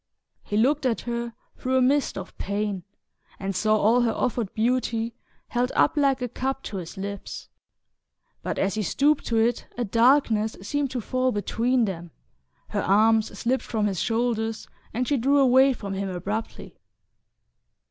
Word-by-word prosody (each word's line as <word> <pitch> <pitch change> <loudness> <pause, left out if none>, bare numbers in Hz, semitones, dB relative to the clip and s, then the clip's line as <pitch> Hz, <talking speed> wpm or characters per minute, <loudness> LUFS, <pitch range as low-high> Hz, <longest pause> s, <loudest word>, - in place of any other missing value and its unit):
He 205 - -3
looked 270 +4 +3
at 230 - -1
her 235 -1 -4 0.2
through 260 +1 +1
a - - +4
mist 275 -1 +2
of 190 -1 -7
pain 200 -1 -2 0.6
and 195 0 -3
saw 215 +3 +3
all 225 +4 +4
her 235 -2 +2
offered 235 -3 -1
beauty 230 0 0 0.4
held 245 +1 0
up - - +3
like 275 -3 +2
a - - 0
cup 265 +3 -3
to 200 - -5
his 175 -1 -7
lips; 200 +1 -6 0.9
but - - -3
as 195 - +1
he 220 - -1
stooped 280 - +1
to 230 - +1
it 230 +1 +1
a 245 - 0
darkness 230 -1 +3
seemed 290 +6 -1
to 250 -1 -3
fall 255 +3 0
between 235 +3 +1
them, 175 -4 -5 0.6
her - - -1
arms 215 +1 +3
slipped 250 +5 0
from 220 -3 -1
his 195 -4 -1
shoulders 225 -1 -1 0.2
and 250 +2 -2
she 290 - +2
drew 275 +4 +3
away 265 0 +6
from 200 -6 -5
him 195 0 -2
abruptly. 200 +5 -5
230 Hz, 165 wpm, -25 LUFS, 210-255 Hz, 0.9 s, away